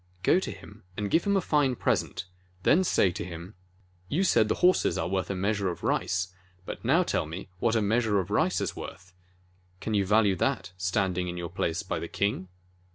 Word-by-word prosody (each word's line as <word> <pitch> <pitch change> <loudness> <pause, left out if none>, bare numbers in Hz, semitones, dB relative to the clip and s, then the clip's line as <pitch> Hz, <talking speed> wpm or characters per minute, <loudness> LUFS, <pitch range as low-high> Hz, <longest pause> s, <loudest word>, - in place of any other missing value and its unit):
"Go 180 - +5
to - - -4
him 105 +2 -11 0.2
and 105 -1 -2
give 165 - +3
him 200 -1 +3
a - - +2
fine 145 -6 +2
present, 95 - -1 0.4
then 175 - +5
say 100 - +3
to 100 +4 -5
him: 85 +2 -8 0.6
'You 175 +7 +1
said 110 - +4
the - - +1
horses 185 - +3
are - - -1
worth 95 -1 -1
a 100 - -1
measure 100 +1 0
of 85 - -6
rice, 90 +1 0 0.3
but - - -7
now 155 +10 +4
tell 80 - -1 0.3
what 115 -1 +2
a 110 - +2
meas 115 +4 +2
ure 105 -2 +2
of 95 +1 -4
rice 160 - +2
is - - -2
worth! 90 +2 -9 0.7
Can 110 - -3
you 100 -2 +3
value 105 0 +3
that - - -1
standing 90 0 0
in 90 0 -4
your 85 -1 -4
place 85 -2 -1
by - - -3
the - - -5
king?' 100 -2 -1
100 Hz, 210 wpm, -28 LUFS, 90-115 Hz, 0.7 s, Go